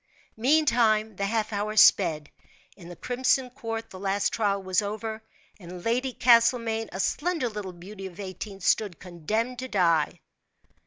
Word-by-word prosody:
Meantime, 230 -5 +2
the 200 +1 -2
half 220 0 -1
hour 210 +1 -2
sped. 160 -8 +4 0.4
In 175 -3 -13
the 175 - -9
crimson 255 +2 0
court 225 -3 -6
the 185 - -10
last 195 +1 0
trial 200 -3 0
was 185 +1 +1
over, 220 +2 -5 0.4
and 180 -1 -10
Lady 250 +3 0
Castlemaine, 230 -2 +3
a 190 - -6
slender 320 - 0
little 210 -4 -6
beauty 190 +3 -9
of 185 +1 -14
eighteen 195 +1 -7
stood 190 -1 +1
condemned 215 +8 -3
to 260 - -5
die. 170 -8 +1
215 Hz, 150 wpm, -26 LUFS, 190-235 Hz, 0.4 s, sped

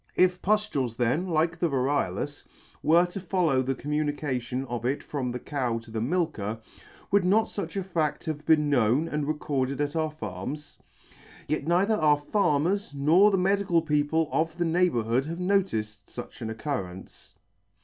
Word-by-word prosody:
If 180 0 +3
puftules 185 - 0
then, 125 +10 +1
like 165 0 +1
the 170 - +1
variolous, 140 -1 -1 0.4
were 170 +3 +5
to 180 +2 -6
follow 175 -7 +1
the 130 +1 -1
communication 145 -4 -2
of 120 -2 -4
it 130 +4 -1
from 135 -4 -3
the 125 - -3
cow 125 -4 -2
to 115 -1 -10
the 110 -1 -2
milker, 115 - -1 0.5
would 200 -1 +4
not 210 +5 +4
fuch 195 -6 -5
a - - -3
fa& 165 -5 0
have 155 -2 -4
been 150 -1 +4
known, 135 +2 +2
and 150 -2 -2
recorded 140 -3 -1
at 145 +1 -1
our 160 -1 +1
farms? 130 +2 -7 0.7
Yet 155 0 -2
neither 185 +6 +3
our 155 -7 +4
farmers 165 +2 0
nor 165 +9 +5
the 195 - +2
medical 185 -3 +2
people 150 +1 +1
of 160 +1 0
the 175 - 0
neighbourhood 135 -8 +1
have 165 +3 -5
noticed 180 - -1
fuch 120 - -9
an 110 - -3
occurrence. 110 -6 -6
150 Hz, 160 wpm, -27 LUFS, 130-175 Hz, 0.7 s, were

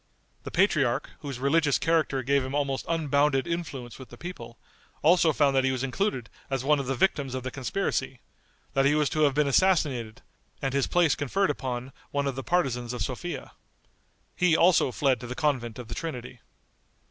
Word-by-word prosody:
The - - -4
patriarch, 155 -10 +1
whose 140 -4 -6
religious 145 +2 +2
character 155 -5 +1
gave 140 +1 +2
him 130 +2 -4
almost 140 -2 -1
unbounded 145 -4 +2
influence 145 -9 -5
with 130 - -11
the - - -12
people, 120 -10 -8 0.5
also 170 +1 +5
found 145 -2 +2
that 135 - +3
he 130 - +2
was 130 0 -2
included 135 - -1 0.2
as 135 -2 -1
one 150 +1 +3
of 135 - -4
the 135 - 0
victims 135 -3 0
of 130 - -4
the 130 - -4
conspiracy; 130 -2 -2 0.5
that 135 - +3
he 145 +2 +4
was 150 -2 +2
to 155 - -2
have 145 -3 +3
been 150 0 +3
assassinated, 140 -8 +1 0.4
and 135 -1 -2
his 140 -1 +1
place 175 -4 +3
conferred 190 +8 0
upon 125 -1 -4 0.2
one 140 0 -1
of 140 - -1
the 135 - -5
partisans 125 -8 0
of 125 - -2
Sophia. 155 +7 -5 0.8
He 180 -3 +3
also 170 -6 +4
fled 130 -2 +1
to 125 - -8
the 125 - -5
convent 130 -7 -1
of 125 -2 -8
the - - -5
Trinity. 125 -6 -6
140 Hz, 190 wpm, -27 LUFS, 130-160 Hz, 0.8 s, also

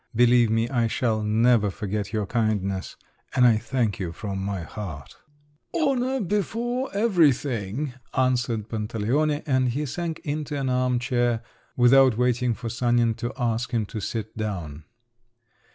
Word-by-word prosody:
Believe 120 0 +5
me 115 +1 +1
I 120 -2 +1
shall 110 -1 0
never 110 0 +3
forget 105 0 -4
your 110 -2 -1
kindness, 100 -4 -1 0.4
and 125 - +5
I 115 -3 +6
thank 115 -2 -1
you 90 -4 -3
from 95 +2 -5
my 100 -2 -3
heart." 80 -7 -8 0.6
"Honour 265 -4 +1
before 230 +6 -1
everything!" 145 - +1 0.2
answered 125 -4 +1
Pantaleone, 120 +8 -1
and 130 -4 +2
he 145 +5 -2
sank 165 +3 -3
into 150 -1 -3
an 135 -1 -1
arm 125 0 +1
chair, 120 -2 0 0.3
without 130 -1 +6
waiting 125 -1 +1
for 120 - -6
Sanin 120 0 +2
to 120 +1 -3
ask 120 -1 -1
him 115 -2 +1
to 110 - -6
sit 110 0 -4
down. 85 -9 -5
120 Hz, 140 wpm, -25 LUFS, 110-135 Hz, 0.6 s, I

